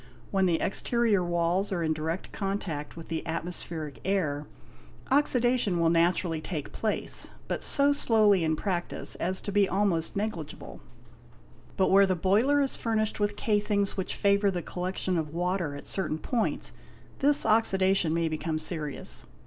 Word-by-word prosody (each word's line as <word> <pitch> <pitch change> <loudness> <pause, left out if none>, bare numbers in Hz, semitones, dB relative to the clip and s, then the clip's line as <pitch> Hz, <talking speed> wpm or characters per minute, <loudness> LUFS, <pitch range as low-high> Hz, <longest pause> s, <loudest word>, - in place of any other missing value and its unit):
When 190 -1 +2
the 170 -2 +1
exterior 220 -1 +1
walls 175 +3 0
are 175 -3 -1
in 160 -1 +1
direct 160 +3 -4
contact 195 -7 -4
with 165 - -9
the 165 -1 -2
atmospheric 160 -2 -5
air, 150 -7 -1 0.6
oxidation 245 -8 +2
will 165 -1 +3
naturally 170 -1 +1
take 155 -4 -5
place, 215 -1 -3 0.2
but - - -3
so 285 0 +7
slowly 215 -8 +3
in 160 0 +1
practice 175 0 -3
as 185 +2 +1
to 205 - -5
be 200 -1 +2
almost 185 -4 0
negligeable. 200 -7 -5 1.0
But 190 - +2
where 195 0 +6
the 185 - +1
boiler 220 - +2
is 270 - -2
furnished 220 -2 -1
with 205 0 0
casings 205 -2 0
which 190 - -3
favour 200 0 +2
the 180 -3 -3
collection 185 0 -2
of 155 0 -5
water 175 -4 -1
at 145 - -9
certain 165 -5 -2
points, 230 +7 -1 0.5
this 285 +1 +4
oxidation 195 -5 +2
may 165 0 0
become 155 0 -2
serious. 155 -2 -3
185 Hz, 150 wpm, -28 LUFS, 165-205 Hz, 1.0 s, so